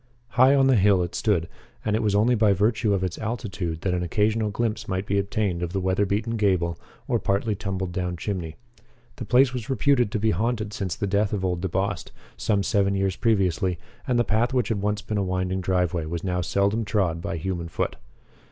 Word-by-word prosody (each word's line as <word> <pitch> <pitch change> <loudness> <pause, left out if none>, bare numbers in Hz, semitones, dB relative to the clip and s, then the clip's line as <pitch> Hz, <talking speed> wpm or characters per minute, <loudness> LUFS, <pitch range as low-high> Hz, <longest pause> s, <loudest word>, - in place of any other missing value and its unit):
High 130 +5 +5
on 135 -1 +4
the 130 -2 +4
hill 100 -2 +4
it 85 - -5
stood, 90 -7 +1 0.4
and 105 -1 +1
it 110 - +1
was 105 -2 +1
only 110 +4 +4
by 110 -3 +4
virtue 110 +2 +1
of 95 -2 +1
its 90 -3 -3
altitude 100 -7 -3
that 95 - 0
an 90 - 0
occasional 105 +5 +1
glimpse 110 0 -2
might 95 +1 -2
be 100 0 +1
obtained 100 -3 -1
of 85 +2 -3
weatherbeaten 100 +4 0
gable 90 -6 +1 0.3
or - - +1
partly 100 +2 0
tumbled 95 -2 -3
down 90 -1 -3
chimney. 85 -4 -4 0.6
The 120 - -5
place 125 +4 +4
was 125 -2 -5
reputed 135 -4 +2
to 115 - 0
be 110 +1 +2
haunted 110 +2 -1
since 95 -4 -3
the 110 - -2
death 100 +1 +1
of 95 -2 -1
old 90 -2 -1
DeBost, 95 +1 -2 0.3
some 100 -2 0
seven 100 -2 +1
years 95 -1 0
previously, 95 -5 +1 0.3
and 125 - +2
the 120 - +4
path 120 +4 +1
which 125 -5 +1
had 105 -4 -1
once 105 0 -1
been 105 -1 -2
a - - +1
winding 95 0 -1
driveway 90 -2 0
was 85 +1 -4
now 90 -1 -1
seldom 100 +5 +1
trod 95 -6 0
by 85 - -3
human 85 0 -3
foot. 85 - -2
100 Hz, 205 wpm, -25 LUFS, 90-110 Hz, 0.6 s, High